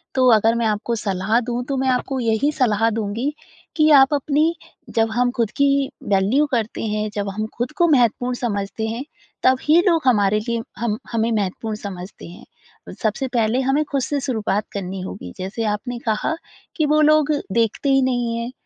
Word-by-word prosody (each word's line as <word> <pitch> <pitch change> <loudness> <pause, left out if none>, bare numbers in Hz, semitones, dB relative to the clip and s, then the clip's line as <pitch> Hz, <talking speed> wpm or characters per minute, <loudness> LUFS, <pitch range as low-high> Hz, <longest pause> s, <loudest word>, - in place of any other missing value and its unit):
तो 260 -1 +4
अगर 225 +1 +3
मैं 235 - 0
आपको 220 +2 -1
सलाह 195 +3 +1
दूँ 245 0 -2
तो 275 - 0
मैं 265 0 0
आपको 260 +1 -1
यही 230 +4 +1
सलाह 225 -3 +3
दूँगी 225 +7 -2 0.4
कि 310 -1 +4
आप 270 +2 +4
अपनी 290 +2 +2 0.5
जब 225 0 +3
हम 245 +2 +1
ख़ुद 230 -3 +1
की 280 - +5 0.5
वैल्यू 205 +10 +3
करते 230 -2 -1
हैं, 215 0 -1
जब 205 -1 -2
हम 215 +2 -3
ख़ुद 240 +3 -2
को 345 - +6
महत्वपूर्ण 250 -3 +2
समझते 215 -2 -3
हैं 230 +4 -4 0.4
तब 260 0 +5
ही 315 +3 +5
लोग 335 -3 +3
हमारे 210 -3 +3
लिए 235 -1 -1 0.2
हम 215 -1 -1
हमें 230 0 0
महत्वपूर्ण 215 +1 -2
समझते 195 -3 -8
हैं। 175 - -13 0.6
सबसे 220 +5 -1
पहले 230 +1 +2
हमें 270 +3 +1
ख़ुद 275 -1 +1
से 285 +3 -1
शुरुआत 215 -6 -1
करनी 190 -1 -4
होगी। 90 - -7
जैसे 195 +5 -4
आपने 245 +4 -5
कहा 220 +8 0 0.4
कि 310 - +1
वो 305 +1 +3
लोग 305 0 +4 0.2
देखते 230 +4 +1
ही 270 0 +4
नहीं 245 -3 0
हैं, 235 +1 -4
230 Hz, 185 wpm, -21 LUFS, 210-265 Hz, 0.6 s, को